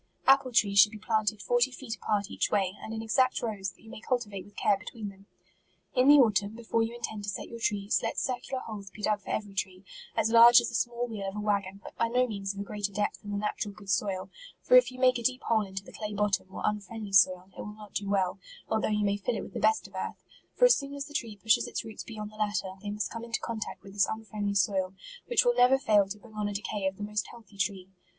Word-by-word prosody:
Apple 270 -1 +5
trees 200 -4 +4
should 210 +2 +8
be 220 - -8
planted 215 -1 0
forty 245 +6 +3
feet 250 -2 -6
apart 205 -2 -1
each - - 0
way, 195 -2 +1
and 220 - -7
in 225 0 -4
exact 255 +3 +2
rows, 205 -4 -2
that - - -19
you 225 - -14
may - - -8
cultivate 215 -7 -2
with 205 - -18
care 205 - +3
between 210 +1 -7
them. 195 0 -16 0.7
In 255 0 +3
the 290 - +9
autumn, 210 -4 +3
before 230 0 -1
you 225 +1 -1
intend 220 -3 -5
to - - -3
set 200 - -5
your 230 - -8
trees, 205 -2 +1
let - - -3
circular 255 +1 -2
holes 205 -3 -7
be 210 +2 -12
dug 210 -1 +2
for - - -12
eve 215 - -1
ry 200 - -13
tree, 190 -1 -3 0.3
as 225 - +2
large 235 +1 +9
as - - -2
the - - -10
small 240 +1 -1
wheel 210 -4 -5
of 195 - -9
a - - -3
wag 205 -2 +1
gon, 195 +1 -10
but - - -11
by 230 - +3
no 250 +2 +2
means 200 -4 -3
of 200 - -9
a - - -2
greater 205 0 -3
depth 205 +1 -2
than 205 - -9
the 205 - -2
natural 205 0 -3
good 200 -2 -6
soil; 190 0 -1 0.3
for - - +5
if - - +7
you 255 - -11
make 255 -1 +4
a - - -5
deep 255 +2 0
hole 225 -1 +2
into 195 -1 -5
the - - -14
clay 210 -1 -5
bottom, 205 -2 +1
or - - -7
unfriendly 210 0 -3
soil, 185 -1 +4
it - - -7
will 210 - -7
not 210 -1 -13
do 200 -1 -2
well, 195 -1 +1 0.3
although 220 0 +1
you 210 -1 +1
may 200 0 +1
fill 230 +4 -2
it - - -4
with - - -10
the - - -3
best 440 - +2
of - - -21
earth; - - -5 0.3
for - - +5
as - - +7
soon 280 0 -5
as 280 0 -4
the 295 - -12
tree 225 -6 -3
pushes 220 +2 +2
its - - -4
roots 220 -1 -7
beyond 215 -2 -7
the 215 - -15
latter, 210 -3 -1
they 205 - -5
must 205 -2 -3
come 230 0 -6
into 230 -1 -2
contact 225 -2 -5
with 195 - -12
this 200 -1 +3
unfriendly 215 -2 -3
soil, 190 -2 +1 0.3
which 485 - +3
will 485 - +5
never 255 - +5
fail 210 -6 +3
to 205 +2 -6
bring 220 +1 -16
on 210 -1 -2
a 205 - -3
decay 200 -1 -2
of 190 0 -3
the 205 - -6
most 210 0 -2
healthy 220 -4 -15
tree. 195 -2 -1
210 Hz, 270 wpm, -29 LUFS, 200-230 Hz, 0.7 s, the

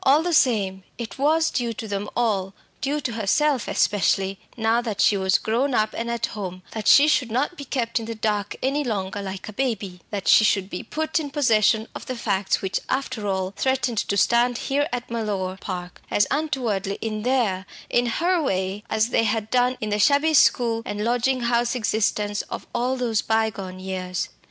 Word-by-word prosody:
All 285 +4 +5
the 350 0 -1
same, 200 -9 +2
it 230 0 -7
was 320 +3 +3
due 240 -2 -1
to 220 - -7
them 205 0 -3
all, 200 -5 0 0.3
due 290 +2 -1
to 255 - -2
herself 235 +5 +1
especially, 195 -1 +1 0.2
now 225 +1 +2
that 220 -4 -4
she 205 - +5
was 190 -1 +2
grown 245 +4 0
up 215 0 +1
and 235 +1 -3
at 235 0 0
home, 185 -5 -6
that 220 -2 -4
she 285 +2 +7
should 260 -5 +2
not 260 +10 -1
be 285 - -8
kept 240 -3 -1
in 225 - -6
the 230 - -4
dark 210 -2 -1
any 280 +3 +1
longer 200 -5 -3
like 190 -1 -6
a 215 - -7
baby, 200 -7 -2
that 200 -3 -4
she - - +7
should 195 -2 +1
be 180 - -4
put 315 +1 -2
in 295 -2 -4
possession 225 -6 +2
of - - -8
the 255 - -3
facts 200 -5 0
which, 190 - -1
after 255 -5 -2
all, 190 -1 -1
threatened 260 -4 0
to 200 - -1
stand 240 +3 +3
here 285 +4 0
at 245 -1 -4
Mellor 200 -5 -2
Park, 180 -2 -6
as 205 - +3
untowardly 235 -10 -1
in 215 -1 -3
their, 220 -6 0 0.2
in 245 0 +1
her 345 +8 +1
way, 190 -5 -1
as 220 +1 +1
they 230 - +2
had 220 0 -1
done 250 0 +2
in 215 -1 -3
the 210 - 0
shabby 285 +8 +4
school 235 -4 +4
and 205 -1 -4
lodging 245 +2 +1
house 240 +1 +1
existence 210 -2 0
of - - -6
all 250 +2 0
those 230 -4 0
bygone 220 -4 -1
years. 185 -1 -3
225 Hz, 195 wpm, -24 LUFS, 200-255 Hz, 0.3 s, she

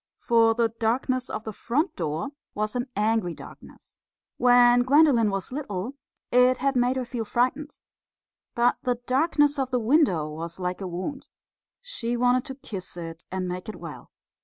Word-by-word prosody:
For 225 -1 +3
the 230 -1 +2
darkness 245 +3 -1
of 215 - -4
the 220 - -6
front 295 - -1
door 160 - -3 0.3
was 215 +2 -2
an 245 +1 -1
angry 210 -4 +1
darkness. - - -13 0.4
When 245 0 +6
Gwendolen 260 -4 +4
was 195 +2 -3
little, 245 -4 -4 0.4
it 250 +1 +5
had 275 +1 0
made 250 +1 +2
her 260 -1 -2
feel 235 -1 -4
frightened. 255 +7 -1 0.8
But 240 +1 +3
the 250 -1 0
darkness 290 +1 +2
of 265 -1 0
the 255 - +1
window 230 - +2
was 165 +3 -7
like 180 +1 -3
a 190 - -3
wound. 185 +11 -5 0.5
She 245 - -3
wanted 250 +1 +2
to 265 - -7
kiss 195 -9 -8
it 165 -1 -8
and 185 -1 -2
make 180 +3 -5
it 215 - -6
well. - - -10
240 Hz, 165 wpm, -26 LUFS, 195-255 Hz, 0.8 s, When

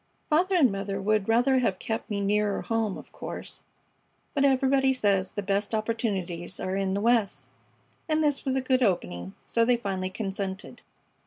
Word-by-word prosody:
Father 365 +5 +3
and 280 - +5
mother 195 0 -3
would 210 +1 +1
rather 245 +3 +4
have 200 -7 +1
kept 225 +3 -4
me 205 -2 -1
nearer 205 0 +1
home, 225 -3 -1
of - - -12
course, - - -7 0.7
but 280 - +1
everybody 270 0 +3
says 200 -6 +1
the 205 - -5
best 200 +2 0
opportunities 195 -6 -2
are 185 +1 -2
in 195 -1 0
the 200 - -1
West, 230 -3 +1 0.6
and 310 0 +2
this 290 -2 +1
was 265 -1 0
a 265 - +1
good 255 0 +1
opening, 95 - -1
so 230 - +2
they 245 +1 +3
finally 190 -5 -3
consented. 195 0 -5
210 Hz, 170 wpm, -27 LUFS, 195-255 Hz, 0.7 s, and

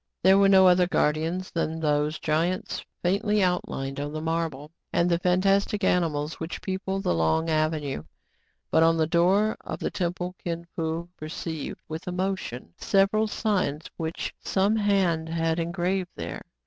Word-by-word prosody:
There 190 +2 +6
were 200 0 +5
no 190 -1 +7
other 180 0 +5
guardians 165 +3 0
than 160 -1 -2
those 150 0 +1
giants 165 +4 -1 0.2
faintly 205 +3 +2
outlined 135 -6 -1
on 145 +1 -4
the 155 - -3
marble, 160 -2 -2 0.2
and 170 - +2
the 170 -1 +2
fan 180 +1 +2
tastic 200 +1 +2
animals 160 -4 +1
which 160 +1 -5
people 190 0 -3
the 195 - 0
long 85 - +1
avenue. 155 - 0 0.7
But 160 - +4
on 165 0 +4
the 160 - +3
door 185 +6 +3
of - - -5
the - - -3
temple 180 0 -2
Kin 170 -1 -3
Fo 165 +1 -2
perceived, 155 0 -5
with 160 +3 -6
emotion, 180 - -3
several 200 +3 +2
signs 185 -9 -1
which 160 0 -4
some 200 +3 +1
hand 190 -6 +1
had 165 0 0
engraved 175 +2 -1
there. - - -5
170 Hz, 155 wpm, -26 LUFS, 160-190 Hz, 0.7 s, no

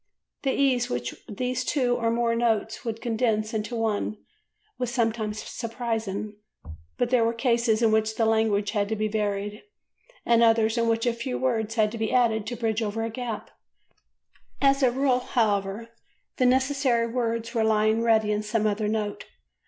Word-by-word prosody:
The 270 - 0
ease 260 -3 +2
with 125 0 -3 0.2
which 255 0 -1
two 250 -4 +1
or 230 -2 0
more 230 0 +1
notes 230 -2 0
would 225 -1 -5
condense 225 -2 0
into 220 +2 -3
one 215 -1 -1 0.6
was 250 -2 -1
sometimes 225 -3 -1
surprising, 225 -3 -4 0.6
but 245 0 0
there 250 -3 +4
were 230 +1 0
cases 235 -2 +1
in 225 - +4
which 220 0 +1
the 225 - +1
language 220 -2 +2
had 205 -2 0
to 220 - 0
be 215 0 -1
varied 210 0 -2 0.6
and 235 -1 +4
others 225 -1 +4
in 230 -1 +1
which 230 0 +1
a 240 - +2
few 235 +2 -4
words 225 -4 -1
had 215 -2 +2
to 230 - -6
be 220 -1 -1
added 225 -4 +2
to 240 - -3
bridge 225 -1 -1
over 220 +1 -2
a 225 - -3
gap; 240 -1 -5 1.1
as 275 0 +3
a 260 - +5
rule, 260 0 +2
however, 215 -2 -1 0.5
the 255 - +3
necessary 260 -2 +2
words 230 -1 -2
were 225 -2 +1
lying 220 0 +2
ready 220 -2 +3
in 210 0 0
some 215 +1 -1
other 210 0 0
note. 210 -1 -2
225 Hz, 175 wpm, -26 LUFS, 215-240 Hz, 1.1 s, a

